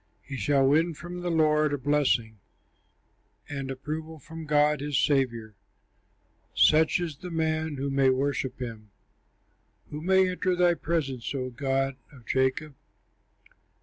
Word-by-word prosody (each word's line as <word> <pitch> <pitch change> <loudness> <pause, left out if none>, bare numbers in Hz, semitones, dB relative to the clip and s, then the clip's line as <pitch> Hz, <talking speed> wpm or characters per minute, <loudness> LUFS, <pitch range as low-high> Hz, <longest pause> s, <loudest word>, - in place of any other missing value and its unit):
He 135 - -7
shall 135 0 +2
win 160 +4 +2
from 175 +3 -8
the 175 0 -3
Lord 155 -2 +2
a - - 0
blessing, 130 -6 +1 1.1
And 140 -2 -5
approval 155 +4 -5
from 160 +2 -10
God 150 -1 +3
his 145 -1 -1
Saviour. 120 -7 +1 1.0
Such 160 +3 +4
is 165 -5 -4
the 180 - -8
man 160 -2 -1
who 140 +1 -3
may 135 -1 +3
worship 135 0 -1
him, 115 -4 -7 1.0
Who 150 - -5
may 190 +2 +4
enter 185 0 0
thy 175 -1 +4
presence, 145 -7 -3
O 130 -1 -3
God 135 0 -1
of 130 -5 -16
Jacob. 130 +4 0
145 Hz, 135 wpm, -27 LUFS, 135-160 Hz, 1.1 s, Such